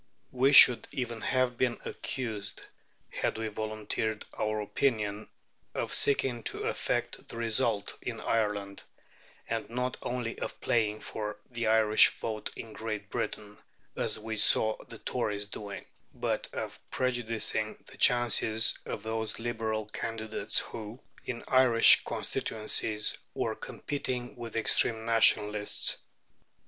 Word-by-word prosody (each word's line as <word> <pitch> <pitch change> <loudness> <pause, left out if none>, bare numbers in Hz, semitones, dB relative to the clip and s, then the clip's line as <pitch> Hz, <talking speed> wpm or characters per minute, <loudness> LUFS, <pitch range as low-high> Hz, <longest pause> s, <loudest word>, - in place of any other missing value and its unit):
We 130 +2 +3
should 125 -4 +8
even 120 -4 -4
have 130 -2 0
been 125 -2 +1
accused, 110 -6 -4 0.5
had - - -1
we 110 0 -3
volunteered 110 0 -3
our 110 0 -1
opinions, 105 -1 -1 0.5
of - - -2
seeking 135 -4 +2
to - - -2
affect - - -2
the - - -6
result 115 -2 +1
in - - -5
Ireland, 105 -3 -1 0.7
and, 115 -1 -3
not 125 +2 -2
only 120 -2 -3
of - - -5
playing 110 -2 0
for 105 -1 -5
the 120 -2 -2
Irish 110 -1 +6
vote 110 -2 -4
in 110 -1 -8
Great 110 -2 -5
Britain, 105 -1 -4 0.4
as - - -1
we 110 0 -5
saw 110 +1 +4
the 115 - -9
Tories 105 -4 -2
doing, 100 0 -8 0.3
but - - -2
of - - -5
prejudicing 115 -4 -1
the - - -12
chances 115 -2 +4
of - - -5
those 110 0 -2
Liberal 110 -2 -2
candidates 110 0 -1
who, 110 +2 -8 0.3
in 120 -2 -5
Irish 130 -3 +7
constituencies, 110 -1 -1 0.2
were - - -1
competing 125 -4 -4
with 115 -2 -8
extreme 110 0 +2
Nationalists. 105 -2 +3
110 Hz, 125 wpm, -30 LUFS, 105-120 Hz, 0.7 s, should